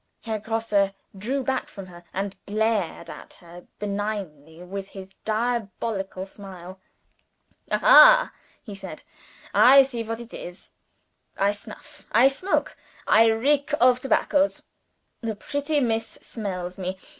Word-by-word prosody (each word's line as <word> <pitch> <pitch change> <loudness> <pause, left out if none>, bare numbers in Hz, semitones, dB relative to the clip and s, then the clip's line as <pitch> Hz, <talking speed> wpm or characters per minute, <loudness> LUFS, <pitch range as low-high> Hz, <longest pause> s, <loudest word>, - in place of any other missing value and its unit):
Herr 220 -2 -3
Grosse 210 -3 0 0.2
drew 255 +8 -2
back 265 0 -2
from 195 -2 -10
her, 175 -1 -14
and 195 +1 -4
glared 210 -5 -1
at - - -11
her 175 0 -14
benignantly 200 -6 -5
with 195 +2 -6
his 195 -1 -11
diabolical 215 -4 -2
smile. 190 -2 -11 0.9
"Aha!" - - +7 0.3
he 210 - -9
said. 190 -5 -9 0.5
"I 270 +2 +8
see 255 -3 -5
what 225 0 -5
it 235 0 -11
is. 175 +2 -10 0.7
I 200 +1 +2
snuff, 230 +8 -14
I 245 +5 +6
smoke, 365 +8 -2 0.3
I 225 +1 +5
reek 280 +6 +1
of 250 0 +5
tobaccos. 285 +2 +1 0.6
The 225 -2 -3
pretty 285 +6 -2
Miss 225 -3 0
smells 185 -5 -7
me. 185 0 -4
215 Hz, 125 wpm, -24 LUFS, 190-245 Hz, 0.9 s, I